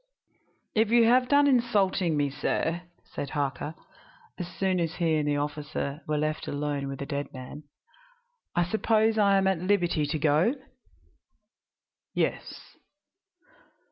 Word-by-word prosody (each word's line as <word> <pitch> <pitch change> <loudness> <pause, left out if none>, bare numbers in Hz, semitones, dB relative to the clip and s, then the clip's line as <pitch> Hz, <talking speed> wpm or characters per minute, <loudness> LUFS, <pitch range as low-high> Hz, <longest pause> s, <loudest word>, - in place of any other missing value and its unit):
"If 220 0 +2
you 235 0 +5
have 250 +2 +4
done 285 0 +5
insulting 195 - +2
me, 145 -1 +1
sir," 165 +4 -1 0.2
said 140 - -6
Harker, 145 +1 -3 0.6
as 180 - -3
soon 185 0 -1
as 165 -1 -1
he 165 -2 +1
and 150 -1 -1
the 145 0 +1
officer 145 0 -3
were 150 0 0
left 155 +1 -2
alone 145 -1 -2
with 135 0 -5
the 140 - -5
dead 145 0 -4
man, 135 +3 -9 0.9
"I 175 - +3
suppose 220 +3 +2
I 200 -1 +5
am 195 - +2
at 190 -3 +2
liberty 175 -5 +1
to 150 - -1
go?" 155 - +2 1.6
"Yes." - - -3
165 Hz, 140 wpm, -27 LUFS, 145-200 Hz, 1.6 s, you